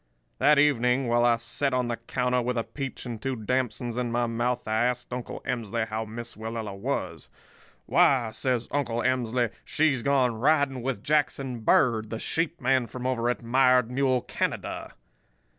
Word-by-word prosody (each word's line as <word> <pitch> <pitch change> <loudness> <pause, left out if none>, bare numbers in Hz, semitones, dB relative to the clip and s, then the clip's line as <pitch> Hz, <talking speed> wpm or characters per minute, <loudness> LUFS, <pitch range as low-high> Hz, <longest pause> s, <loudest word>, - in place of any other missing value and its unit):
"That 150 +2 +5
evening, 135 -2 +3
while 120 0 +3
I 120 -1 +4
set 130 +4 -1
on 125 -1 0
the 120 -1 -2
counter 125 +1 0
with 125 +1 -2
a 115 - +1
peach 135 +1 -6
and 115 -3 -6
two 135 -1 -2
damsons 120 +1 -2
in 120 -1 -2
my 120 +1 +1
mouth, 120 +1 -1
I 110 +2 +2
asked 125 0 -2
Uncle 125 -1 -6
Emsley 115 -2 -2
how 110 +1 -3
Miss 115 +2 -7
Willella 110 -2 -5
was. 125 +8 -4 0.6
"'Why,' 120 - +3
says 125 0 -1
Uncle 120 -5 -1
Emsley, 120 -2 +1
'she's 145 -5 +1
gone 130 -4 +2
riding 140 -1 +2
with 120 -5 -3
Jackson 140 -4 0
Bird, 110 -2 +3
the 115 - -4
sheep 165 +7 -2
man 130 -1 +2
from 125 +1 -7
over 120 -2 0
at 120 -2 -2
Mired 125 0 +3
Mule 130 -1 +2
Canada. - - -3
125 Hz, 170 wpm, -27 LUFS, 115-130 Hz, 0.6 s, That